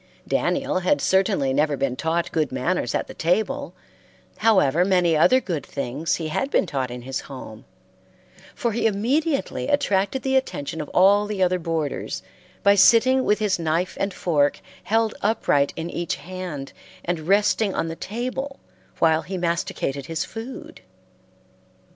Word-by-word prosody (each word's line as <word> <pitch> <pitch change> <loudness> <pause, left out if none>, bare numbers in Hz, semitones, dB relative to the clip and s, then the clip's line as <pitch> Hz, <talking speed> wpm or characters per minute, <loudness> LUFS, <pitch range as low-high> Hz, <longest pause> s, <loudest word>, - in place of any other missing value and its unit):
Daniel - - 0
had 185 +11 +2
certainly 190 -8 +2
never 145 +1 +1
been 135 -1 -1
taught 165 +4 -1
good 155 -4 0
manners 130 +1 -1
at - - 0
the - - -10
table, 220 - -1 0.6
however 185 -8 +3
many 180 -3 +3
other 255 - +5
good 175 - -4
things 145 +6 -2
he 160 -2 -4
had 270 - -1
been - - +2
taught 135 -6 -2
in 125 0 -7
his 130 +1 -3
home, 130 -5 -10 0.9
for 235 - -1
he 225 +1 +1
immediately 270 +9 0
attracted 255 -4 +1
the 265 0 +1
attention 160 - -1
of 150 - -7
all 200 +3 +4
the 205 -3 0
other 180 0 +2
boarders 160 -3 -3 0.4
by 200 - +6
sitting 245 +6 +5
with 210 - +3
his 210 -4 0
knife 165 +3 -1
and 195 - 0
fork 145 -6 +1 0.3
held 225 0 +1
upright 200 -10 +2
in 165 - -4
each 170 -1 -2
hand 175 -5 -7 0.3
and 170 -2 -3
resting 205 +1 +2
on - - -1
the 165 - -5
table 255 +8 -4 0.4
while 160 -1 +3
he 185 +5 -5
masticated 170 -5 -2
his 165 -1 -2
food. 230 +4 -9
180 Hz, 155 wpm, -23 LUFS, 155-215 Hz, 0.9 s, by